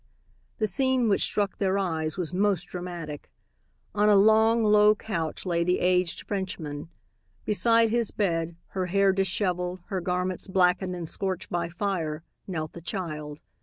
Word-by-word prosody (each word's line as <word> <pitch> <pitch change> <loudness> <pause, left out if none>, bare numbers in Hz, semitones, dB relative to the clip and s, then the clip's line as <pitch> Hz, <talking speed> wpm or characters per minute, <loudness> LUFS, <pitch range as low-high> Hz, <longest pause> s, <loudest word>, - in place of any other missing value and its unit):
The 220 - +1
scene 255 +3 +1
which 195 - +2
struck 200 -2 0
their 195 -1 +1
eyes 160 -4 -1
was 180 -2 -1
most 195 -2 +2
dramatic. 175 -5 -7 0.6
On 210 0 +3
a 205 - +6
long, 220 +3 +5
low 210 0 +5
couch 170 -8 -4
lay 170 -2 +1
the 180 +1 +2
aged 180 -1 +1
Frenchman. 165 -6 -4 0.6
Beside 230 +3 +3
his 235 -2 +1
bed, 170 -4 -1
her 185 -2 -2
hair 195 +1 +3
disheveled, 185 -1 -1
her 190 -3 -2
garments 180 +1 -2
blackened 185 -1 +2
and 170 -2 -5
scorched 190 +1 -4
by 170 -1 -1
fire, 170 -4 -3 0.2
knelt 160 -5 -4
the 170 - -9
child. 155 -5 -5
185 Hz, 150 wpm, -27 LUFS, 170-205 Hz, 0.6 s, a